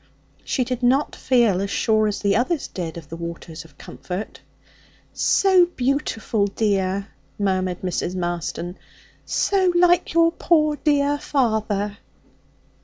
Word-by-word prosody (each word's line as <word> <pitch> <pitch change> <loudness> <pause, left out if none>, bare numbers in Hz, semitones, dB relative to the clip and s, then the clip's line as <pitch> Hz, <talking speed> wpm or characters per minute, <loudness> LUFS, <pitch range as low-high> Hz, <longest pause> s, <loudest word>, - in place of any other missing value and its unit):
She 260 - 0
did 250 0 -4
not 260 +4 +2
feel 235 -7 +2
as 200 - -2
sure 215 +1 +2
as 205 - -3
the 200 -1 +2
others 270 +6 0
did 170 -3 -6
of 155 -4 -10
the 165 - -6
waters 170 -1 -7
of 165 - -20
comfort. 185 +4 -7 0.7
'So 375 -3 +4
beautiful, 250 -8 -1
dear,' 195 -1 -1 0.3
murmured 185 -3 -1
Mrs. 180 0 -2
Marston, 175 0 -4 0.5
'so 380 -2 +2
like 350 -1 +3
your 335 0 +5
poor 310 -3 +2
dear 290 -1 +1
father.' 215 -7 -1
215 Hz, 125 wpm, -22 LUFS, 185-285 Hz, 0.7 s, your